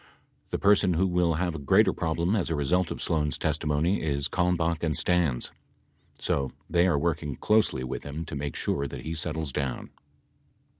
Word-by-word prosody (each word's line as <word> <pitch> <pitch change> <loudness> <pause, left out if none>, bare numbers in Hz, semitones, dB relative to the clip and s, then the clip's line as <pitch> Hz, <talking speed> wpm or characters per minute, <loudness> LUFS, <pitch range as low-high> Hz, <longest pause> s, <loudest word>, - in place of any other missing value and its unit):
The - - -1
person 100 -2 +4
who 90 +4 +2
will 90 -2 +2
have 90 +1 -1
a 80 - -5
greater 70 - +4
problem 85 +5 0
as 95 -6 0
a 80 - 0
result 85 +5 +1
of - - -5
Sloan's 75 -3 0
testimony 80 +4 0
is 70 -3 0
Kalmbach 85 -2 +1
and 80 -3 0
Stans. 85 -9 +1 0.7
So 70 -1 -1 0.2
they 85 +2 +3
are 80 -5 +2
working 75 -3 -1
closely 105 -12 +2
with 65 - -4
him 75 +3 -6
to - - -6
make 70 -1 -4
sure 70 0 -1
that - - -7
he 80 - -3
settles 80 -2 -2
down. 70 -3 -3
80 Hz, 180 wpm, -27 LUFS, 75-90 Hz, 0.7 s, person